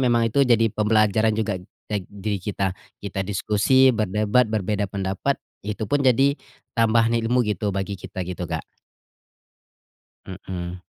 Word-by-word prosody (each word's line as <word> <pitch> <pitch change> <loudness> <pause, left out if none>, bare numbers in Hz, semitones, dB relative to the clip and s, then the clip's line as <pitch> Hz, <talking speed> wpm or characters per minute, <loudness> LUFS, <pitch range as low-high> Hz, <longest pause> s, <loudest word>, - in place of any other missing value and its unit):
memang 120 -3 +3
itu 140 - +3
jadi 115 -3 +4
pembelajaran 110 0 +2
juga 105 -4 -1 0.3
teg 100 -4 -3
diri 100 0 -4
kita 95 0 -2 0.3
kita 100 -1 -3
diskusi, 105 +7 +3
berdebat, 110 +2 +2
berbeda 105 -1 -1
pendapat 95 +8 -1 0.2
itu 105 +2 -4
pun 145 +7 0
jadi 135 +2 +4 0.4
tambahan 115 0 +3
ilmu 120 +2 +2
gitu, 105 -1 -1
bagi 95 0 -3
kita 95 0 -5
gitu, 90 -1 -5
Kak. - - -3 1.6
Mhm. 90 -1 -6
105 Hz, 130 wpm, -23 LUFS, 95-115 Hz, 1.6 s, jadi